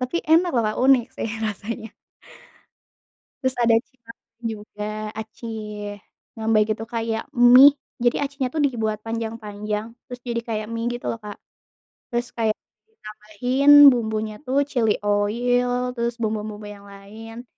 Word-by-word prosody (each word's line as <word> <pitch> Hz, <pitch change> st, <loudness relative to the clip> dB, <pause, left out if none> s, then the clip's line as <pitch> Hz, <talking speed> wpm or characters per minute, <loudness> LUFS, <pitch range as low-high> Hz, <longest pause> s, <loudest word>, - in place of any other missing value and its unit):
Tapi 255 Hz, +5 st, -2 dB
enak 330 Hz, +3 st, +4 dB
loh 230 Hz, -, +3 dB
Kak. 215 Hz, -, -2 dB
Unik 255 Hz, -2 st, +4 dB
sih -, -, -3 dB, 0.2 s
rasanya. 220 Hz, +1 st, -5 dB, 1.5 s
Terus 260 Hz, -1 st, -1 dB
ada 230 Hz, -1 st, +4 dB
cirambay 235 Hz, -1 st, -7 dB, 0.2 s
juga, 210 Hz, 0 st, -8 dB, 0.3 s
aci 220 Hz, +2 st, -8 dB, 0.9 s
rambay 220 Hz, -1 st, +3 dB
gitu 220 Hz, +1 st, -4 dB
kayak 225 Hz, -1 st, -3 dB
mie, 250 Hz, +4 st, +8 dB, 0.2 s
jadi 240 Hz, +3 st, +1 dB
aci 280 Hz, 0 st, -6 dB
nya 260 Hz, -, +1 dB
tuh 295 Hz, +4 st, -1 dB
dibuat 220 Hz, -6 st, -1 dB
panjang-panjang, 220 Hz, -1 st, -4 dB, 0.2 s
terus 245 Hz, -1 st, -8 dB
jadi 235 Hz, -1 st, -2 dB
kayak 215 Hz, -2 st, -3 dB
mie 230 Hz, +1 st, -2 dB
gitu 240 Hz, -, -3 dB
loh 230 Hz, -, -6 dB
Kak. 210 Hz, -1 st, -8 dB, 0.7 s
Terus 240 Hz, 0 st, -3 dB
kayak 220 Hz, -2 st, 0 dB, 0.3 s
ditambahin 245 Hz, -, -2 dB, 0.2 s
bumbunya 220 Hz, -3 st, -2 dB
tuh 275 Hz, +2 st, +2 dB
chili 240 Hz, -6 st, +1 dB
oil, 245 Hz, +4 st, +1 dB
terus 235 Hz, -1 st, -2 dB
bumbu-bumbu 215 Hz, -1 st, -3 dB
yang 200 Hz, 0 st, -13 dB
lain, 220 Hz, +4 st, -11 dB
230 Hz, 135 wpm, -23 LUFS, 215-245 Hz, 1.5 s, mie